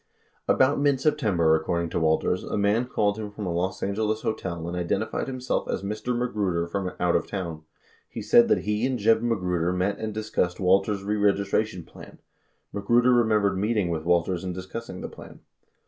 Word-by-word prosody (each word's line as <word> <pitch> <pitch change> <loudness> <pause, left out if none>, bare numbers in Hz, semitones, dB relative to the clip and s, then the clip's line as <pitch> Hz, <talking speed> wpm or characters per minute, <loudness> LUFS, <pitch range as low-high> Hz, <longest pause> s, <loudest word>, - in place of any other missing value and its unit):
About 130 +2 +3
mid 140 -2 +2
September, 110 - +2
according 85 +1 -1
to - - 0
Walters, 80 +3 +1
a - - -3
man 105 +4 +2
called 105 -3 0
him 105 -1 -5
from 105 0 -7
a 90 - -2
Los 90 +2 -2
Angeles 110 +2 -1
hotel 85 -6 -3
and 85 - -4
identified 90 -1 -2
himself 130 -1 -2
as 95 - -2
Mr. 110 +4 -2
Magruder 100 -8 -1
from 90 +1 -3
"out 90 -1 +2
of - - 0
town." 85 -5 -5 0.5
He - - -6
said 235 -1 +6
that 220 - +2
he 105 +2 -1
and 130 -1 -1
Jeb 110 +1 +3
Magruder 90 -7 0
met 90 +3 -1
and 110 -1 -3
dis 110 0 -6
cussed 90 0 0
Walters' 95 +2 +2
reregistration 100 -1 0
plan. - - -14 0.6
Magruder 120 +5 +3
remembered 105 -5 +2
meeting 105 -3 0
with 80 -2 -2
Walters 85 +1 +1
and 90 -1 -4
discussing 95 +1 -7
the - - -4
plan. - - -13
100 Hz, 180 wpm, -25 LUFS, 90-110 Hz, 0.6 s, said